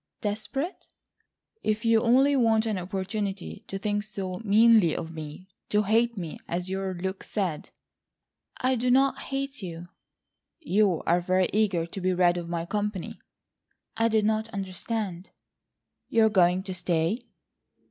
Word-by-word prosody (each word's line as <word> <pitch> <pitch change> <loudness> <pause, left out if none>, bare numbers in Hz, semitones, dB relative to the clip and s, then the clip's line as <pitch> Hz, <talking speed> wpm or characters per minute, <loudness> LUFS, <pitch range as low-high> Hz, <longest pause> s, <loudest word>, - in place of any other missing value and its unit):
"Desperate?" 225 - -3 0.7
"If 215 +2 -1
you 225 -1 +4
only 265 +4 +4
want 225 -3 +3
an 215 -4 -1
opportunity 195 +2 -4
to 195 - -4
think 205 +1 -1
so 195 -3 -5
meanly 215 -4 +5
of 165 -1 -5
me,—to 175 +6 -4
hate 230 +2 +2
me, 170 -4 -5
as 180 +2 -3
your 190 -1 -2
look 190 +2 -4
said." 185 -8 -3 0.9
"I 255 +1 +1
do 250 +2 0
not 270 +2 +4
hate 275 -1 -4
you." 170 -2 -6 0.7
"You 205 - +2
are 175 +2 +2
very 185 +1 +2
eager 195 -6 +2
to 180 +3 -7
be 185 0 +1
rid 175 -1 +3
of 170 -1 -5
my 170 -1 -2
company." 205 -1 -3 0.8
"I 225 +1 +2
did 220 -2 +2
not 220 +1 0
understand." 195 -1 -4 0.8
"You 225 -1 +4
are - - +4
going 185 -2 +3
to 190 -1 -5
stay?" 180 +6 -1
200 Hz, 145 wpm, -27 LUFS, 180-225 Hz, 0.9 s, meanly